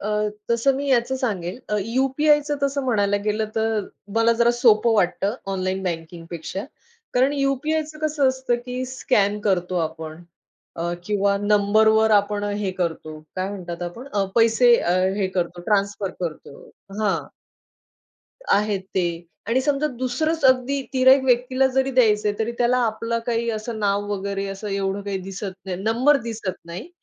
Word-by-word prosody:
अ, 205 - -4 0.4
तसं 235 +4 +3
मी 280 +1 -3
याचं 260 +1 +2
सांगेल 200 -7 -3
अ, 210 - 0
यू-पी-आयचं 290 +5 +2
तसं 280 0 0
म्हणायला 205 -5 +2
गेलंतर 215 0 -1 0.3
मला 230 +1 +4
जरा 235 0 +5
सोपं 235 -2 +4
वाटतं 200 +1 +1 0.2
ऑनलाईन 190 0 -2
बँकिंगपेक्षा. 170 +1 -5 0.5
कारण 260 +3 +3
यू-पी-आयचं 300 +3 -1
कसं 300 -3 +1
असतं 260 -1 0
की 250 +1 -3
स्कॅन 210 -5 +1
करतो 180 -1 0
आपण 160 +1 -9 0.5
अ, 170 +1 -2
किंवा 200 0 +1
नंबरवर 215 +2 +4
आपण 205 0 +2
हे 205 -1 -2
करतो, 160 -3 -3 0.2
काय 185 +1 -1
म्हणतात 175 -3 -6
आपण, 200 +10 -7 0.3
पैसे 230 +1 +5
अ, 175 - +1 0.2
हे 200 -2 +1
करतो, 175 0 -1
ट्रान्सफर 200 -2 0
करतो. 160 -5 -6 0.4
हां. 205 -3 0 1.3
आहेत 205 -1 +2
ते. 175 -2 -1 0.2
आणि 240 +3 +2
समजा 290 +2 +1
दुसरंच 290 +5 -1
अगदी 260 +2 +3
तिर्‍हाईत 260 +1 +6
व्यक्तीला 255 +1 +2
जरी 265 0 +2
द्यायचंय, 210 -4 +3
तरी 225 +1 -1
त्याला 245 +1 +3
आपलं 230 +1 -2
काही 235 -1 0
असं 220 +1 -4
नाव 205 -1 0
वगैरे 200 0 -3
असं 195 +2 -6
एवढं 195 0 -2
काही 200 -1 -3
दिसत 195 +1 -6
नाही, 185 -2 -4
नंबर 240 +7 +3
दिसत 220 -5 -4
नाही. 175 - -8
215 Hz, 145 wpm, -23 LUFS, 195-255 Hz, 1.3 s, तिर्‍हाईत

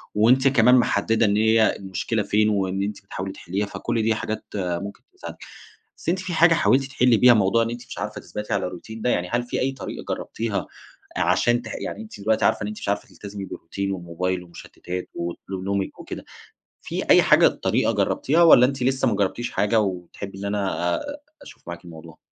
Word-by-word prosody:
وأنتِ 125 +6 +4
كمان 125 -2 +5
محددة 115 -2 +2
إن 100 0 +2
هي 110 0 +4
المشكلة 100 +3 -2
فين، 105 +1 +2
وإن 95 -2 0
أنتِ 105 0 -5
بتحاولي 95 0 -5
تحليها، 95 +2 -3
فكل 115 +3 -2
دي 110 0 +2
حاجات 110 0 -4
ممكن 95 +1 -3 0.2
تساعدِك. - - -8 0.6
بس - - -4
أنتِ 185 +2 +1
في 185 -1 -5
حاجة 165 +1 +6
حاولتِ 140 -5 +3
تحلّي 125 -3 +3
بيها 125 +2 +7
موضوع 110 +1 +3
إن 115 - -2
أنتِ 120 +1 -7
مش - - -9
عارفة - - -5
تثبتي 105 +1 -5
على 100 -1 0
الروتين 110 +5 -9
ده؟ 125 - +1
يعني 90 -5 0
هل 120 +1 +1
في 120 - -3
أي 135 - +1
طريقة 135 - -7
جرّبتيها 110 -3 -4 0.5
عشان 120 0 +2
تح 115 -2 -8
يعني - - -5
أنتِ 220 - -11
دلوقتي 110 +2 +1
عارفة - - +2
إن 100 - -2
أنتِ 105 0 -6
مش - - -4
عارفة 100 0 -1
تلتزمي 100 -1 -8
بالروتين 100 +2 -5
والموبايل 90 0 -3
والمُشتتات 90 +1 -8
وأسلوب 90 +2 -5
نومِك 100 0 -2
وكده، - - -8 0.6
في - - -4
أي - - +8
حاجة - - +6
طريقة - - 0
جربتيها 160 +5 +2
والّا 125 -7 +8
أنتِ 135 0 -4
لسه 130 +1 +2
ما - - +1
جربتيش 105 +5 -1
حاجة 110 +2 +2
وتحبي 95 0 -5
إن 100 - -6
أنا 100 -4 -1
آآ 290 0 -5 0.2
أشوف - - -14
معاكِ 85 +1 -7
الموضوع؟ 80 -1 -12
105 Hz, 195 wpm, -23 LUFS, 95-120 Hz, 0.6 s, أي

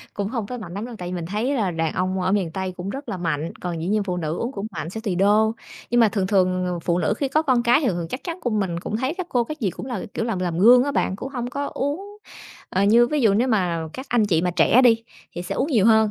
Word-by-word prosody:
Cũng 200 -1 -2
hông 230 -3 -3
tới 250 +3 -6
mạnh 180 -5 -8
lắm 205 - -4
đâu, 245 - -8
tại 180 - -5
vì 180 - -4
mình 170 -2 -4
thấy 215 +9 -1
là 210 -8 0
đàn 165 -1 -1
ông 185 +1 -1
ở 185 +1 0
miền 195 -5 +1
Tây 190 0 -3
cũng 180 +2 -5
rất 275 +6 -7
là - - -3
mạnh, 165 -2 -2
còn 175 -2 -4
dĩ 170 - -2
nhiên 210 +1 +2
phụ 180 -2 -2
nữ 160 -1 -2
uống 240 +3 -3
cũng 200 -4 -5
mạnh 160 -2 -5
sẽ 220 - -6
tùy 210 -5 -2
đô. 210 +4 +3 0.4
Nhưng 240 0 +4
mà 225 - +6
thường 200 -2 -1
thường, 185 -2 +2
ờ, 180 -1 -2
phụ 170 +1 0
nữ 200 - +1
khi 275 - -1
có 310 +4 +2
con 255 -6 +2
cái 240 +4 +4
thì 285 - 0
thường 185 - +1
thường 170 -2 -4
chắc 255 - -6
chắn 345 0 -5
của 245 - -1
mình 190 -6 -1
cũng 210 - -3
thấy 260 +7 -1
các 370 -1 -5
cô 245 -6 +1
các 305 +5 -7
gì 205 -6 +1
cũng 255 - -8
là, 240 -7 -4
kiểu, 225 - -1
làm 225 -5 -2
làm 175 -2 -2
gương 245 +6 +7
á 285 - -1
bạn, 190 - 0
cũng 255 - -6
không 245 -3 -4
có 285 +1 -3
uống. 385 +10 -3 0.5
Ờ, 190 - 0
như 230 +4 +5
ví 300 +4 0
dụ 220 -5 +4
nếu 240 +5 +2
mà 175 -8 0
các 260 +2 -7
anh 230 -3 +2
chị 165 -5 +2
mà 180 - +1
trẻ 180 +9 +4
đi, 230 -2 +5 0.3
thì 175 - -5
sẽ - - -4
uống 285 - 0
nhiều 225 -6 +4
hơn, 220 -1 +5
210 Hz, 315 wpm, -23 LUFS, 180-245 Hz, 0.5 s, gương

